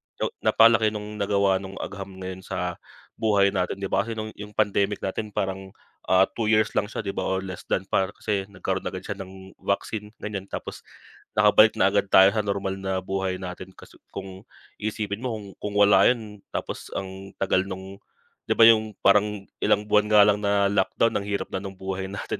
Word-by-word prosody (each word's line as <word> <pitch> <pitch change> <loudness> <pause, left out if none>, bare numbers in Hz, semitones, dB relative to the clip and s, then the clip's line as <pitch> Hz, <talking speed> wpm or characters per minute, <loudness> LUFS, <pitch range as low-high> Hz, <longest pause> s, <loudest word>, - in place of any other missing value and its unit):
yo - - -2
napalaki 110 -1 +4
no'ng 105 0 -6
nagawa 100 -1 +2
no'ng 95 0 -9
agham 100 -1 -6 0.2
ngayon 95 0 -6
sa 90 -1 -4 0.4
buhay 100 -3 +3
natin, 95 +1 -2
'di 95 - -3
ba? - - +2
Kasi 115 - -4
no'ng 110 0 -5
'yong 105 0 -11
pandemic 100 -1 +1
natin 100 +3 -3
parang, 95 0 -3 0.3
ah, 95 0 +5
2 110 -2 0
years 110 0 +3
lang - - +2
siya 110 - -4
'di 100 - -2
ba - - -3
or 95 0 -1
less 95 -2 -8
than 95 - 0
pa, 95 - +2
kasi 100 -2 -2
nagkaroon 100 -2 -4
agad - - -6
siya 100 - -5
ng 95 0 -10
vaccine 105 +2 -3
ganiyan. 100 -2 -5
Tapos - - -7 0.5
nakabalik 105 +1 +6
na 95 - +3
agad 100 -1 +1
tayo 95 0 +7
sa 110 - -1
normal 95 -1 -2
na 95 -1 -2
buhay 95 0 -2
natin, 90 -1 -8
kasi - - -16 0.2
kung 95 +2 -8 0.3
iisipin 105 -1 -3
mo, 125 -2 -3
kung 105 -2 -8
kung 105 0 -4
wala 100 -1 +6
'yun, 110 -4 -1 0.2
tapos - - -4
ang 95 0 -7
tagal 95 0 +1
no'ng 95 +1 -8 0.5
di - - +1
ba - - +6
'yung 110 -2 +4
parang 105 0 +3 0.2
ilang 105 - +2
buwan 105 0 +3
nga 105 -1 +8
lang 105 0 +3
na 100 -1 +2
lockdown, 105 +3 +1
ang 100 - -7
hirap 100 -1 -2
na 95 - -2
no'ng 95 -1 -8
buhay 95 0 -4
natin 100 +1 -5
100 Hz, 200 wpm, -25 LUFS, 95-105 Hz, 0.5 s, nga